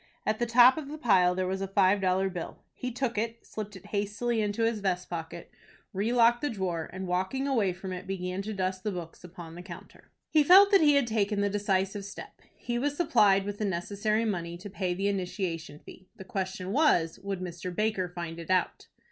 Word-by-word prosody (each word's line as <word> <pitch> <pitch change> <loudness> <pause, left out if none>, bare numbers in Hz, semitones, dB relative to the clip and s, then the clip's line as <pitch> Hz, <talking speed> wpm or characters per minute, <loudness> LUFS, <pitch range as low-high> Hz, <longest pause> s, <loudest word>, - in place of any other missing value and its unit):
At 215 0 0
the 240 - 0
top 245 +3 +7
of 290 - -7
the 300 +2 -7
pile 185 -9 +3
there 185 0 -1
was 190 +1 -2
a 195 - -2
five 195 +1 +3
dollar 190 +1 +2
bill. 180 -3 -7
He 250 - -5
took 240 -3 -2
it, 230 +1 -4
slipped 210 -1 -7
it 190 - -12
hastily 210 +3 -1
into 210 +2 -1
his 225 -1 +1
vest 185 -3 -2
pocket, 165 -2 -6 0.4
relocked 235 +4 +3
the 295 - 0
drawer, 180 -7 -3
and, 190 +2 -6
walking 190 +10 -1
away 225 -9 +2
from 185 +1 -6
it, 180 - -7
began 185 0 -3
to 215 +2 -5
dust 185 -1 -2
the 210 - -1
books 175 -3 -8
upon 175 -2 -10
the 175 - -9
counter. 175 -2 -12 0.2
He 305 -2 +5
felt 390 +6 +8
that 395 - +6
he 295 -2 +5
had 280 -3 +3
taken 210 -2 0
the 205 0 +1
decisive 200 0 0
step. 195 - -10 0.2
He 240 0 -3
was 290 +2 -1
supplied 205 - +4
with 205 0 -5
the 215 - 0
necessary 205 +4 -1
money 170 -5 -3
to 200 +3 -10
pay 185 -3 -2
the 195 +2 -1
initiation 180 -5 -3
fee. 185 +4 -15
The 205 - -10
question 190 -1 -4
was, 200 - +2
would 195 -1 -4
Mr. 180 0 -5
Baker 210 -3 0
find 170 -2 -6
it 165 - -9
out? 185 -1 0
195 Hz, 215 wpm, -28 LUFS, 185-225 Hz, 0.4 s, felt